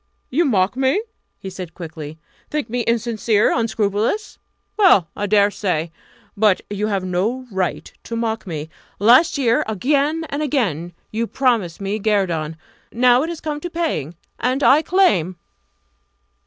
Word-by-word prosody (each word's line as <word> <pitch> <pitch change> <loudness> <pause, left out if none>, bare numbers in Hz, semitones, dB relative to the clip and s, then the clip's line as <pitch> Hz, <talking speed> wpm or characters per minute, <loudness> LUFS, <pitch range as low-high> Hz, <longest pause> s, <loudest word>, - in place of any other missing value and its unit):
"You 330 +7 +2
mock 200 -5 +2
me?" 265 +8 +2 0.4
he 190 - -8
said 180 -3 -8
quickly 160 -3 -8 0.3
"think 295 -7 -3
me 245 - -1
insincere, 230 -2 +1
unscrupulous? 220 - -1 0.4
Well, 280 - +5
I 205 - -2
dare 205 0 +4
say! 170 -6 -2 0.4
But 205 -2 +3
you 205 +1 -1
have 195 -3 -1
no 205 +9 -1
right 190 -2 -3
to 230 - -5
mock 225 -2 -2
me. 155 -2 -5 0.3
Last 245 - +5
year, 240 -4 +2
again 285 - 0
and 285 +2 -2
again, 195 - -1 0.2
you 230 +2 -1
promised 230 -12 0
me 200 +2 -2
guerdon. 175 -7 0 0.3
Now 245 +1 +4
it 320 - -2
has 340 -2 -6
come 300 -1 -3
to 350 - -5
paying 310 - -2 0.2
and 255 +3 0
I 290 +3 +6
claim!" 210 - +2
220 Hz, 145 wpm, -20 LUFS, 185-265 Hz, 0.4 s, I